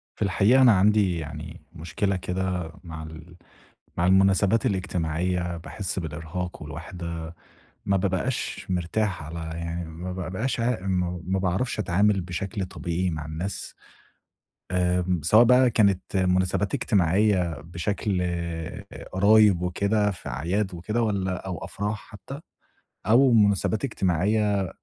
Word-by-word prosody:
في - - -23
الحقيقة 105 +7 +4
أنا 125 -3 +8
عندي 100 -2 +3
يعني 80 - -8
مشكلة 95 +5 -2
كده 90 -2 -2
مع 80 -2 -7
ال 80 +2 -11 0.6
مع 85 - +1
المُناسبات 95 +4 +4
الاجتماعية؛ 90 -3 -1
باحِسّ 95 +3 -4
بالإرهاق 80 +2 -5
والوحدة، 85 +1 -6 0.5
ما 100 - +2
بابقاش 95 +6 -2
مرتاح 90 +2 -1
على 80 +3 -7 0.2
يعني 85 +1 -4
ما 85 +3 -6
بابقاش 95 +8 -3
عا 115 -2 0
م 90 -2 -1
ما 95 +1 0
باعرفش 95 +7 -1
أتعامل 100 +1 +2
بشكل 95 +2 -4
طبيعي 90 0 -2
مع 80 -2 -5
الناس، 85 +5 -5 1.0
آمم 90 -1 +1
سواء 105 +9 +6
بقى 125 +1 +5
كانت 100 -4 +1
مُناسبات 95 +2 +1
اجتماعية 95 -1 +2
بشكل 90 +4 -2 0.9
قرايب 100 -1 +5
وكده، 100 +4 +1
في 95 - -8
أعياد 90 +10 -1
وكده، 105 +7 -2
والّا 95 -5 -1
أو 90 -4 -4
أفراح 105 +2 -3
حتى، 135 +7 -9 0.7
أو 125 +4 +6
مُناسبات 105 +1 +3
اجتماعية 100 - +1
95 Hz, 120 wpm, -25 LUFS, 85-105 Hz, 1.0 s, أنا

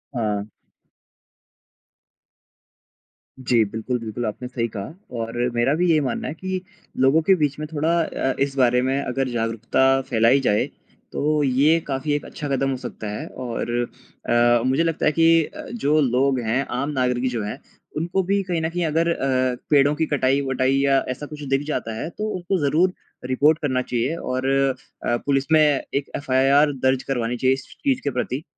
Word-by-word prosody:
हाँ। 105 -3 -1 2.9
जी, 120 -3 +3
बिल्कुल, 110 +4 -3
बिल्कुल 115 +1 -4
आपने 110 +3 -4
सही 120 -2 -2
कहा 100 +9 -5 0.2
और 115 0 -4 0.2
मेरा 120 +4 +2
भी 175 +2 +1
यही 160 -2 +4
मानना 130 -4 -2
है - - -4
कि 185 +3 -4 0.4
लोगों 135 +5 +4
के 190 +4 +4
बीच 150 -5 0
में 155 - -4
थोड़ा 155 +2 0
अ, 135 -4 -2
इस 140 0 0
बारे 125 -1 +4
में 135 +2 0
अगर 135 0 -2
जागरूकता 120 +3 +1
फ़ैलाई 115 +3 +4
जाए 105 -5 +2 0.5
तो 150 +1 +1
ये 140 +5 +3
काफ़ी 140 +2 -1
एक 145 - -2
अच्छा 150 - -6
कदम 135 0 0
हो 135 - -1
सकता 120 -3 -7
है 105 - -5
और 120 -1 -5 0.6
अ, 120 0 +4
मुझे 135 +5 +2
लगता 165 -2 -1
है - - +4
कि 165 +1 +4
अ, - - -10
जो 155 -10 +2
लोग 130 0 +2
हैं 130 +5 +1
आम 140 +2 -1
नागरिक 125 -2 0
जो 115 -3 -2
हैं 105 +6 -5 0.4
उनको 175 +4 0
भी 200 +2 +1
कहीं 175 -3 -2
न 160 - -1
कहीं 175 0 -2
अगर 165 +2 +1
अ, 130 -4 0
पेड़ों 145 0 +4
की 160 +1 0
कटाई-वटाई 135 -1 +1
या 135 -1 +3
ऐसा 130 +3 -4
कुछ 150 0 -9
दिख 135 - +3
जाता 115 -7 -2
है - - -4
तो 210 +5 -4
उनको 185 +1 -1
ज़रूर 175 +6 +2 0.4
रिपोर्ट 150 +5 +3
करना 130 -4 0
चाहिए 125 +5 -1
और 130 -5 -3 0.6
अ, 120 - +2
पुलिस 135 -1 +1
में 155 -1 +6
एक 145 -1 0
एफ़आईआर 140 +2 +3 0.2
दर्ज 130 0 +1
करवानी 120 -1 -1
चाहिए 130 +2 +3
इस 135 0 -5
स - - -14
चीज़ 270 -2 +1
के - - 0
प्रति। 130 +3 -3
135 Hz, 180 wpm, -22 LUFS, 125-150 Hz, 2.9 s, में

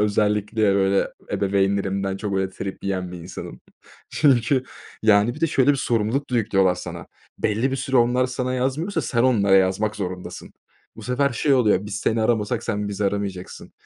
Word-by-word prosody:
Özellikle, 105 0 +1
böyle, 95 0 +2 0.2
ebeveynlerimden 95 0 0
çok 100 0 -4
öyle 95 0 -1
trip 95 +1 -7
yiyen 95 -2 -3
bir 90 - -7
insanım. 85 +2 -9 0.5
Çünkü, 130 -2 +2 0.4
yani, 110 +2 +4
bir 155 - -11
de 165 - +3
şöyle 140 -2 +3
bir 145 - +2
sorumluluk 120 +2 -1
da 125 - +1
yüklüyorlar 95 -5 +2
sana: 85 -2 -8 0.3
Belli 115 +6 0
bir 135 - -1
süre 130 0 -1
onlar 125 +1 +3
sana 130 0 -3
yazmıyorsa 150 +9 -1
sen 115 -3 0
onlara 105 -6 +3
yazmak 95 +3 +1
zorundasın. 90 -2 -6 0.4
Bu - - -10
sefer 135 +3 0
şey 140 +4 +2
oluyor: 105 -6 +2
"Biz 105 - -5
seni 110 +2 0
aramasak 110 0 0
sen 105 -2 -2
bizi 100 0 -3
aramayacaksın." 100 -2 -4
105 Hz, 170 wpm, -23 LUFS, 100-125 Hz, 0.5 s, yani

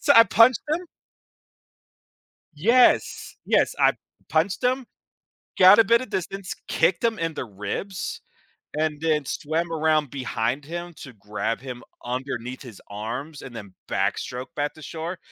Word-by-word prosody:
So, 285 - +5
I 230 - +10
punched 235 +3 +5
him 335 +4 -1 1.7
Yes, 235 +11 +3
yes, - - +2
I - - +5 0.4
punched 170 +8 +1
him, 255 +1 +1 0.7
got 190 +3 +9
a 225 - +8
bit 230 +3 +4
of 255 - -7
distance, 190 +1 -4
kicked 175 -2 +2
him 230 -2 +1
in 165 -1 -2
the - - -4
ribs, 105 - -5 0.6
and 155 -1 0
then 155 -2 +1
swam 160 +5 -2
around 155 -3 +2
behind 125 0 -2
him 175 +3 -6
to 135 - -9
grab 105 +2 -3
him 125 -2 -7 0.2
underneath 125 0 -4
his 115 -7 -11
arms, 120 +9 -6
and 125 -3 -9
then 100 -4 -9
backstroke 125 +1 -1
back 145 0 -2
to 155 - -14
shore. 165 +4 -5
155 Hz, 145 wpm, -24 LUFS, 125-190 Hz, 1.7 s, I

